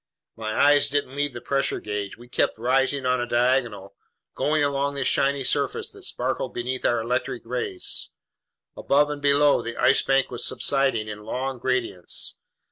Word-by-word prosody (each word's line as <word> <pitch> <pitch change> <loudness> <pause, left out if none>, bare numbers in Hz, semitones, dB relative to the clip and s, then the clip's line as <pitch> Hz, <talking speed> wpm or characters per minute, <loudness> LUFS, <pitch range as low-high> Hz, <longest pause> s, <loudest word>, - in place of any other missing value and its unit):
My 110 -1 -4
eyes 145 0 +5
didn't 145 -2 -1
leave 145 0 -1
the 120 - -7
pressure 135 0 0
gauge. 105 -1 -5
We 120 +1 -14
kept 120 - 0
rising 135 +3 +1
on 125 -1 +2
a 120 - -2
diagonal, 120 -5 0 0.4
going 150 0 +1
along 140 0 0
this 135 -2 0
shiny 140 0 +2
surface - - 0
that - - -13
sparkled - - -2
beneath 125 +2 -3
our 120 - +3
electric 125 +1 -2
rays. 120 -6 -3 0.7
Above 145 +1 +2
and 145 -1 -5
below, 145 0 +4
the 115 0 -6
Ice 135 - +4
Bank 135 0 +1
was 120 - -3
subsiding 135 -6 +1
in 105 0 -7
long 130 +3 -3
gradients. 120 -8 -1
130 Hz, 165 wpm, -24 LUFS, 120-140 Hz, 0.7 s, eyes